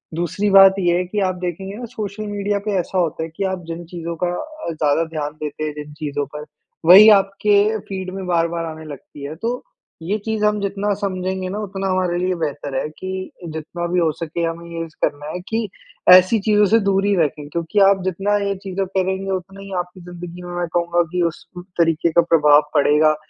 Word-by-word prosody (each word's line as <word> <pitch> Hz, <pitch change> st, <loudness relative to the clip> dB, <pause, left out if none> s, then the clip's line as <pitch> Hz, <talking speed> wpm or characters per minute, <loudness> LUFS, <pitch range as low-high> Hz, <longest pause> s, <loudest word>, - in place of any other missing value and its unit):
दूसरी 180 Hz, +5 st, -1 dB
बात 195 Hz, 0 st, +8 dB
ये 175 Hz, -2 st, +2 dB
है 180 Hz, -, -1 dB
कि 205 Hz, +4 st, -3 dB
आप 185 Hz, -, -2 dB
देखेंगे 190 Hz, +3 st, -4 dB
ना 240 Hz, -, -6 dB
सोशल 210 Hz, 0 st, -5 dB
मीडिया 205 Hz, 0 st, -1 dB
पे 210 Hz, -, -1 dB
ऐसा 185 Hz, +2 st, -3 dB
होता 160 Hz, -2 st, -1 dB
है 165 Hz, -, -5 dB
कि 195 Hz, -, -2 dB
आप 190 Hz, -1 st, -3 dB
जिन 165 Hz, +1 st, -5 dB
चीज़ों 170 Hz, 0 st, -6 dB
का -, -, +3 dB
अ, 310 Hz, -, -5 dB
ज़्यादा 155 Hz, 0 st, +1 dB
ध्यान 155 Hz, -2 st, -4 dB
देते 150 Hz, +1 st, -4 dB
हैं 150 Hz, -, -3 dB
जिन 150 Hz, 0 st, -8 dB
चीज़ों 145 Hz, -1 st, -3 dB
पर 150 Hz, 0 st, -6 dB, 0.4 s
वही 205 Hz, +5 st, +10 dB
आप 195 Hz, -1 st, +4 dB
के 210 Hz, +1 st, +4 dB
फीड 190 Hz, -1 st, -5 dB
में 190 Hz, -1 st, -5 dB
बार-बार 170 Hz, -1 st, 0 dB
आने 160 Hz, -1 st, -7 dB
लगती 145 Hz, 0 st, -10 dB
है। 150 Hz, +3 st, -5 dB
तो 235 Hz, +7 st, -3 dB, 0.4 s
ये 195 Hz, +6 st, -1 dB
चीज़ 220 Hz, -1 st, 0 dB
हम 210 Hz, 0 st, +2 dB
जितना 200 Hz, +1 st, -1 dB
समझेंगे 185 Hz, -1 st, -2 dB
ना 205 Hz, +3 st, -4 dB
उतना 195 Hz, -2 st, -4 dB
हमारे 185 Hz, -2 st, 0 dB
लिए 185 Hz, 0 st, 0 dB
बेहतर 145 Hz, -2 st, -4 dB
है -, -, -2 dB
कि 185 Hz, 0 st, -5 dB, 0.2 s
जितना 160 Hz, +2 st, -5 dB
भी 180 Hz, -, +3 dB
हो 160 Hz, -2 st, +2 dB
सके 165 Hz, +1 st, -3 dB
हमें 165 Hz, +1 st, -3 dB
ये 165 Hz, -, -3 dB
ज 160 Hz, -, -21 dB
करना 145 Hz, 0 st, -1 dB
है 180 Hz, -, -4 dB
कि 225 Hz, -1 st, -1 dB, 0.5 s
ऐसी 185 Hz, +5 st, +6 dB
चीज़ों 210 Hz, 0 st, +5 dB
से 225 Hz, -, +7 dB
दूरी 195 Hz, +1 st, +2 dB
रखें 150 Hz, -2 st, 0 dB
क्योंकि 170 Hz, +5 st, -1 dB
आप 195 Hz, -1 st, +2 dB
जितना 195 Hz, +3 st, 0 dB
ये 200 Hz, -, -1 dB
चीज़ें 195 Hz, 0 st, -2 dB
करेंगे 190 Hz, 0 st, -1 dB
उतना 190 Hz, +1 st, -5 dB
ही 195 Hz, 0 st, -10 dB
आपकी 180 Hz, +1 st, -7 dB
ज़िन्दगी 175 Hz, 0 st, -9 dB
में 175 Hz, 0 st, -7 dB
मैं 175 Hz, -, -1 dB
कहूँगा 175 Hz, 0 st, +2 dB
कि 180 Hz, -1 st, 0 dB
उस -, -, -17 dB, 0.3 s
तरीके 165 Hz, 0 st, +2 dB
का 170 Hz, -, +5 dB
प्रभाव 150 Hz, -3 st, +5 dB
पड़ेगा 150 Hz, +1 st, +4 dB
180 Hz, 215 wpm, -20 LUFS, 165-195 Hz, 0.5 s, वही